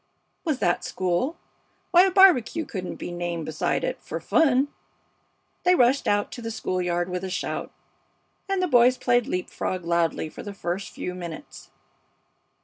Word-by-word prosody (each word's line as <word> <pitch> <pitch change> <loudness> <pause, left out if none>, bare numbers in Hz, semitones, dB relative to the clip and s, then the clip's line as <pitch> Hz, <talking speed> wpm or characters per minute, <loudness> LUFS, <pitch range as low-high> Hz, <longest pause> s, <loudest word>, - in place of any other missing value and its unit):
Was 310 -5 0
that 175 -8 +1
school? 185 - -1 0.5
Why, 360 +1 +7
a - - +2
barbecue 355 - +5
couldn't 185 -8 -5
be - - -6
named 175 -2 -3
beside 155 0 -1
it - - -3
for - - -5
fun! 280 -3 +3 0.9
They 360 0 +4
rushed 255 -1 +3
out 205 0 +1
to 245 - -7
the 225 - -4
school 185 -4 -2
yard 175 0 0
with 180 0 -4
a 190 - -3
shout, 185 - -3 0.8
and 385 -1 +1
the - - +2
boys 250 -3 +5
played 245 -2 +2
leap 180 - -3
frog 185 -2 -3
loudly 170 -2 +1
for - - -10
the 205 -1 -8
first 180 +1 -3
few 180 - -5
minutes. 170 -3 -9
205 Hz, 165 wpm, -25 LUFS, 175-280 Hz, 0.9 s, Why